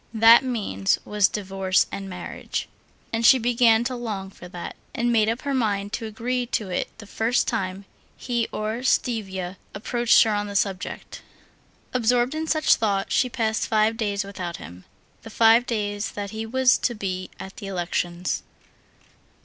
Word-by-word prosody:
That 225 +3 +8
means 205 - 0
was 210 -2 +3
divorce 195 -2 0
and 195 -1 -6
marriage. 180 -1 -5 0.5
And 225 +1 0
she 260 - +8
began 235 -1 +3
to 255 +1 -2
long 210 -5 -5
for 180 - -12
that, 175 -1 -7 0.2
and 240 +1 +1
made 220 -2 +3
up 230 +3 -3
her 280 -1 -1
mind 205 -5 -1
to 230 -2 -3
agree 245 +3 -2
to 210 -5 -2
it - - -1
the 220 - -11
first 225 +4 0
time 190 +1 -2 0.3
he 235 -2 -1
or 215 +2 -3
Stiva 195 -8 -1 0.2
approached 235 +3 +4
her 225 - 0
on 205 0 -1
the 200 - -7
subject. 195 -2 -2 0.7
Absorbed 245 +2 +2
in 315 +1 -3
such 310 -1 +3
thoughts, 200 -3 0
she 255 - +2
passed 220 -2 -1
five 215 +1 +2
days 205 -3 -1
without 185 -3 -6
him, 90 +1 -11 0.4
the 225 - -10
five 230 +2 +5
days 205 -2 -2
that 200 -1 -5
he 220 0 -5
was 260 +2 +3
to 240 - -1
be 185 -3 -4
at 190 0 -9
the 200 - -7
elections. 175 -1 -2
215 Hz, 165 wpm, -24 LUFS, 195-235 Hz, 0.7 s, That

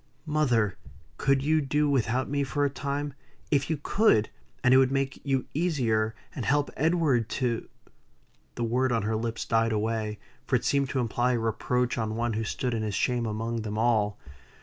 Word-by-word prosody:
"Mother! 120 - +1 0.4
could 135 0 +2
you 155 +1 +3
do 150 +2 +1
without 130 -2 +1
me 140 0 0
for 145 +2 0
a 140 - 0
time? 140 +1 -3 0.4
If 140 -1 +2
you 160 - 0
could, 195 - +3 0.3
and 125 - +5
it - - +8
would 130 0 +4
make 135 0 -1
you 135 -2 0
easier, 120 -10 +1 0.2
and 130 - -4
help 145 +6 +1
Edward 150 -7 +2
to" 120 -3 -1 0.9
The 120 - -2
word 125 +3 +1
on 115 -3 +1
her 110 +1 0
lips 115 +1 -3
died 115 0 +2
away; 110 0 -1 0.3
for - - +2
it - - 0
seemed 140 -2 +2
to 135 - -1
imply 120 +1 +1
a - - +1
reproach 120 +2 0
on 110 -1 -2
one 120 0 -1
who 110 +1 -1
stood 125 +3 -2
in 115 - -1
his 105 -2 -2
shame 120 +1 0
among 115 +2 -2
them 105 -1 -4
all. 110 -3 +2
125 Hz, 190 wpm, -27 LUFS, 110-140 Hz, 0.9 s, it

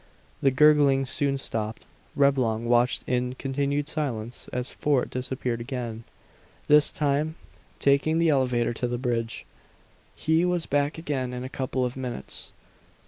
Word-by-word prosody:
The 135 - +5
gurgling 140 -1 +5
soon 140 +1 0
stopped. 110 -4 -4 0.3
Reblong 130 -6 +2
watched 120 +1 +2
in 125 0 -1
continued 140 +2 -1
silence 125 -7 -3
as 125 +1 -3
Fort 145 -4 0
disappeared 125 -2 -3
again, 115 -3 -5 0.6
this 150 0 +6
time 150 +2 0 0.4
taking 140 +3 +3
the 165 0 +3
elevator 125 -5 +2
to 125 +2 -2
the 120 0 -2
bridge. 120 -2 -2 0.7
He 160 +2 +2
was 180 -2 0
back 145 +2 0
again 135 -6 -3
in 125 0 -4
a 130 - -5
couple 130 -1 -2
of 125 - -4
minutes. 125 - -6
130 Hz, 140 wpm, -26 LUFS, 125-145 Hz, 0.7 s, this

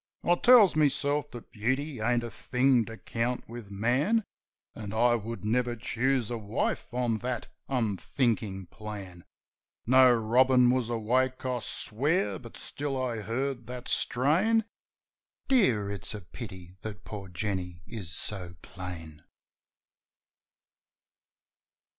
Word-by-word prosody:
I 175 - +4
tells 220 -1 +6
meself 145 -1 +1
that 120 -3 -11
beauty 130 +5 -1
ain't 120 +2 +2
a 120 - -5
thing 125 -1 +2
to 115 0 -9
count 120 +2 -2
with 115 -3 -9
man. 125 - +1 0.5
An' 105 -2 -7
I 120 +2 +4
would 115 -3 -4
never 120 +2 +1
choose 125 +1 0
a 120 - -2
wife 105 +4 -2
on 120 -2 0
that 125 -1 -3 0.2
unthinkin' 110 -4 -1
plan. 100 -5 -8 0.6
No 130 +1 +7
robin 125 +2 +4
was 125 -2 0
awake, 125 +3 0
I 125 -1 0
swear; 145 - 0
but 115 -2 -11
still 140 -2 -4
I 125 -3 -1
heard 120 +3 -3
that 125 0 -7
strain: 185 - +2 0.8
"Dear, 120 - +3
it's 100 +1 -4
a 105 - -7
pity 95 -2 -10
that 105 -2 -7
poor 100 -2 -7
Jenny 90 -2 -4
is 100 -9 -6
so 90 0 -2
plain." 80 -5 -8
120 Hz, 125 wpm, -29 LUFS, 105-130 Hz, 0.8 s, No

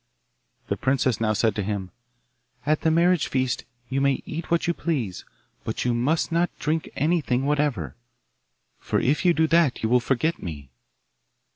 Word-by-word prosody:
The - - -1
princess 130 -4 +1
now 110 -1 +2
said 110 0 +2
to 105 - -2
him, 100 -2 -3 0.7
'At 150 +1 +1
the 160 - +2
marriage 170 +1 +3
feast 130 -2 -1 0.2
you 135 +2 -1
may 140 -1 +1
eat 165 +3 -6
what 170 0 +2
you 170 - +1
please, 130 - -3 0.4
but - - -3
you 120 - +2
must 140 +9 +1
not 170 +1 +2
drink 155 +1 -1
anything 145 -4 +1
whatever, 140 - 0 0.8
for - - 0
if 140 +4 +1
you 175 -2 +4
do 160 - +3
that 165 -8 +3
you 110 - +1
will 125 +1 +5
forget 135 +7 0
me. 70 -6 -7
135 Hz, 165 wpm, -25 LUFS, 115-160 Hz, 0.8 s, will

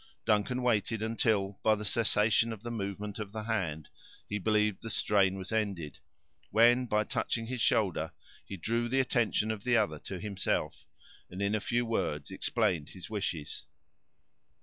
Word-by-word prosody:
Duncan 110 +4 +1
waited, 110 -2 +1
until, 110 -3 0
by 110 -1 +4
the 105 0 -6
cessation 110 +1 +3
of 110 -1 -7
the 120 - -4
movement 105 -1 -4
of 105 -1 -6
the 110 -1 -4
hand, 90 -9 -2 0.4
he 105 - -2
believed 105 -1 +1
the 115 - -6
strain 100 -3 +2
was 95 +1 -6
ended, 100 -9 -2 0.5
when, 120 +4 +5
by 105 -1 +2
touching 115 +2 -1
his 125 0 -4
shoulder, 90 -9 +2 0.3
he 100 - -7
drew 115 +6 -1
the 135 +2 +2
attention 120 -4 +1
of 105 -2 -5
the 120 -1 +3
other 75 -7 +1
to 95 +3 -6
himself, 100 -1 -2 0.4
and 90 - -8
in 100 +1 +1
a 110 - +2
few 120 +3 0
words 90 -10 -2
explained 80 -5 0
his 95 +2 -10
wishes. 85 -8 -3
105 Hz, 165 wpm, -31 LUFS, 95-115 Hz, 0.5 s, when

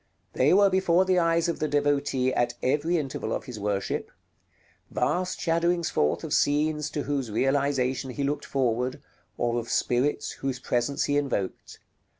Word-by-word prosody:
They 130 +3 +3
were 200 +1 +5
before 185 -1 +3
the 185 -1 +3
eyes 165 0 +2
of 170 - -2
the 155 - 0
devotee 145 -3 +1
at 120 0 0
every 150 +6 +1
interval 140 -4 -3
of - - -2
his 125 -5 -8
worship; 100 -1 -2 0.8
vast 185 +1 -1
shadowings 170 0 +1
forth 75 - +1
of - - -3
scenes 150 +1 +1
to 145 - -3
whose 140 -4 -2
realization 135 +2 0
he 140 +3 -3
looked 145 +1 -2
forward, 130 +1 -1 0.4
or 120 0 0
of 115 - -7
spirits 125 +4 0
whose 135 -2 -3
presence 125 +2 0
he 145 - +1
invoked. 135 -10 -3
145 Hz, 155 wpm, -26 LUFS, 125-160 Hz, 0.8 s, were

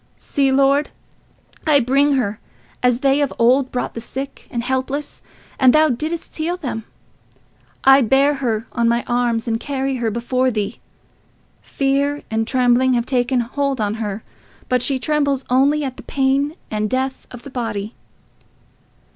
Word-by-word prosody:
"See, 275 -2 0
Lord, 275 +2 +3 0.8
I 295 -2 +6
bring 275 +3 +2
her, 215 -6 -1 0.4
as 250 0 +2
they 275 +1 +3
of 285 - 0
old 255 +3 +3
brought 250 - -3
the 230 - -5
sick 270 +4 -6
and 235 -1 -3
helpless, 265 +3 -3 0.4
and 255 -1 +6
thou 310 0 +5
didst 310 +6 -3
heal 335 +3 -2
them. 240 -9 -5 1.0
I 270 +1 +7
bear 270 +4 +3
her 225 -3 -1
on 235 -1 +1
my 235 +1 +1
arms 240 -1 0
and 225 -1 0
carry 270 0 -2
her 235 -2 -1
before 250 +3 0
thee. 215 -2 -3 0.8
Fear 280 +1 -1
and 220 0 0
trembling 255 0 +3
have 235 -1 +1
taken 250 -1 +1
hold 275 +2 -2
on 210 -1 0
her, 210 0 -4 0.4
but 250 -1 +1
she 265 +2 +1
trembles 280 -1 0
only 280 +4 +3
at 260 -2 -4
the - - -8
pain 275 +2 0 0.2
and 215 0 -1
death 260 +2 -2
of 245 -1 -11
the 280 - -10
body. 225 -4 -4
260 Hz, 155 wpm, -20 LUFS, 235-275 Hz, 1.0 s, I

